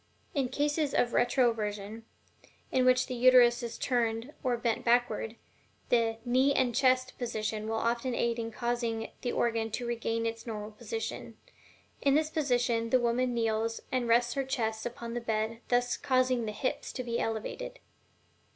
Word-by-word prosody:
In 270 -4 0
cases 290 +2 0
of 240 - +2
RETROVERSION, 225 -3 0 0.7
in 255 -1 +3
which 255 0 +4
the - - -5
Uterus 245 0 +6
is 235 -1 -5
turned 235 +1 -1
or 250 -2 +1
bent 235 -1 -1
backward, 235 -2 +1 0.5
the 230 -2 +2
"knee 260 +3 +3
and 245 -2 +2
chest" 255 0 +2
position 220 -3 -3
will 225 - -1
often 235 +2 0
aid 235 0 0
in 230 0 -3
causing 235 -1 -2
the 245 - -1
organ 230 -1 0
to 240 +3 -4
regain 230 -1 -1
its 230 +1 -4
normal 215 -1 -5
position. 450 - -6 0.6
In 275 -1 +3
this 310 +1 +1
position 245 -6 +1
the 255 - +4
woman 240 +1 +1
kneels, 225 0 0
and 255 -2 0
rests 240 +1 +3
her 275 - -1
chest 225 -4 -2
upon 235 -1 -7
the 240 - -3
bed, 225 0 -2
thus 245 0 +1
causing 255 -3 +1
the - - -2
hips 255 +5 -3
to 255 - -4
be 235 -1 -2
elevated. - - -3
240 Hz, 160 wpm, -30 LUFS, 225-255 Hz, 0.7 s, Uterus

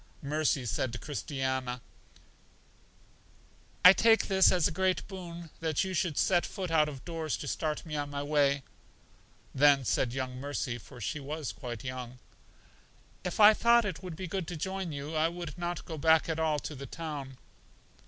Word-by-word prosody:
Mercy, 145 -2 0
said 120 +1 -2
Christiana, 130 -4 -3 2.1
I 180 - +12
take 225 +2 +4
this 190 -1 +5
as 180 -4 +3
a - - -3
great 185 +2 0
boon 175 -4 -8
that 160 -3 0
you 190 0 -3
should 170 -4 -1
set 175 -2 +3
foot 185 -3 -5
out 155 -2 +4
of 135 -3 -10
doors 165 -3 -3
to - - -7
start 155 0 -2
me 155 -2 -5
on 145 -1 -2
my 140 0 -4
way. 140 -2 +2 0.9
Then 140 -1 +5
said 120 +1 +1
young 130 0 -4
Mercy 135 -3 -3
(for 125 0 -13
she 120 +7 -3
was 145 +1 -4
quite 120 -3 -7
young): 125 -1 -6 1.1
If 180 - -4
I 210 0 +9
thought 235 +1 +4
it 185 -5 -4
would 180 -4 -7
be 185 +3 -5
good 185 -1 -3
to 175 - -5
join 190 +1 -3
you, 145 +2 -5
I 155 +1 +3
would 170 -3 -6
not 175 -1 -4
go 160 -2 -6
back 160 +1 +4
at 160 -1 -2
all 160 -2 +1
to 150 - -5
the 140 -1 -8
town. 145 -4 -6
155 Hz, 175 wpm, -30 LUFS, 140-175 Hz, 2.1 s, I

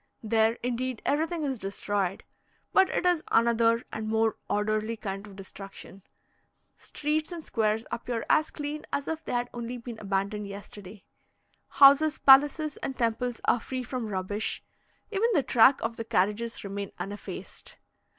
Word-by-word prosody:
There, 220 0 +3
indeed, 250 -1 -2
everything 320 +2 0
is 265 -4 -2
destroyed, 195 -1 -2 0.5
but 380 -1 +5
it - - -1
is 355 -3 +3
another 230 0 +3
and 220 0 -4
more 220 0 +1
orderly 215 +2 0
kind 200 -1 -5
of 200 - -12
destruction 195 0 -11 0.7
streets 305 +2 -2
and 335 -3 -7
squares 220 0 0
appear 235 -1 -3
as 310 0 +3
clean 295 0 -5
as 280 - -2
if 320 0 -3
they - - -5
had 245 0 -1
only 240 +1 -5
been 235 -1 -8
abandoned 200 +1 -2
yesterday. 200 0 -10 0.6
Houses, 285 +2 +6
palaces, 290 +2 +5
and 270 - -5
temples 235 +1 -1
are 240 - +3
free 255 +2 -5
from 250 -2 -4
rubbish; 205 +1 -3 0.5
even 435 +3 +2
the 295 -7 +3
track 255 +3 +5
of 230 +1 -2
the 230 - -3
carriages 220 +3 0
remain 200 0 -5
uneffaced. 200 +3 -7
230 Hz, 150 wpm, -28 LUFS, 210-275 Hz, 0.7 s, Houses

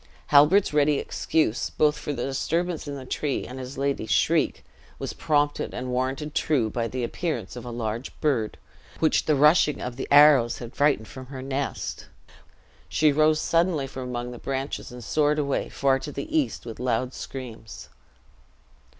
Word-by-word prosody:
Halbert's 150 +6 +6
ready 150 -1 +3
excuse, 155 -7 0
both 150 0 +2
for 150 - -5
the 125 -4 -3
disturbance 165 +5 -2
in 145 - -4
the 135 -2 -8
tree 140 +2 -2
and 130 +1 -8
his 130 +1 -7
lady's 140 -5 -1
shriek, - - +2 0.3
was - - -5
prompted 145 -2 0
and 125 0 -4
warranted 135 +4 -2
true 125 -8 +1
by 115 -1 -1
the 125 +1 -4
appearance 120 - -3
of 120 -1 -8
a - - -5
large 115 +1 -4
bird, 125 -9 0 0.4
which 160 - +2
the 155 - +3
rushing 150 0 +4
of 125 -1 -5
the - - -4
arrows 145 -5 +6
had 120 0 -9
frighted 140 -6 +2
from 130 -2 -10
her 130 -1 -7
nest; 135 +1 -4 0.8
she 155 -1 +3
rose 155 +1 +3
suddenly 165 -4 +1
from 130 -1 -7
amongst 120 0 -4
the 120 - -9
branches, 135 -1 -4
and 125 -1 -9
soared 150 +5 +1
away, 140 -2 -1
far 135 -1 +1
to 145 +2 -6
the 315 - -5
east, 300 - 0
with 115 -1 -8
loud 125 +1 -1
screams. 115 -6 -8
135 Hz, 170 wpm, -25 LUFS, 125-150 Hz, 0.8 s, Halbert's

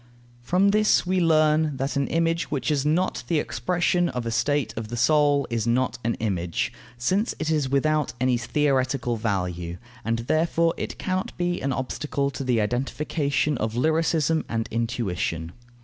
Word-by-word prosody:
From 180 +10 +3
this 210 -1 +3
we 185 +1 +1
learn 155 -2 +3
that 135 +2 -2
an 140 -1 +1
image, 165 0 0
which 140 -1 -1
is 140 -3 +1
not 160 -2 0
the 165 - +1
expression 175 +7 0
of 125 -2 -4
a 115 - -2
state 145 +2 0
of 110 -1 -4
the 120 +2 -5
soul, 145 +1 +3
is 115 -1 -1
not 125 +2 +1
an 115 +1 0
image, 90 -6 -2 0.2
since 190 - 0
it 155 0 -1
is 150 -4 +1
without 150 +2 +1
any 130 0 +2
theoretical 130 0 0
value; 90 -6 -2 0.3
and 115 +1 0
therefore 165 +3 +2
it - - -5
cannot 185 0 -3
be 175 0 -1
an 135 - -1
obstacle 140 +2 -2
to 135 - -5
the 125 -3 +1
identification 140 +5 -1
of 110 +1 -2
lyricism 160 +3 +2
and 115 -1 -1
intuition. 95 -8 -2
140 Hz, 165 wpm, -25 LUFS, 115-160 Hz, 0.3 s, From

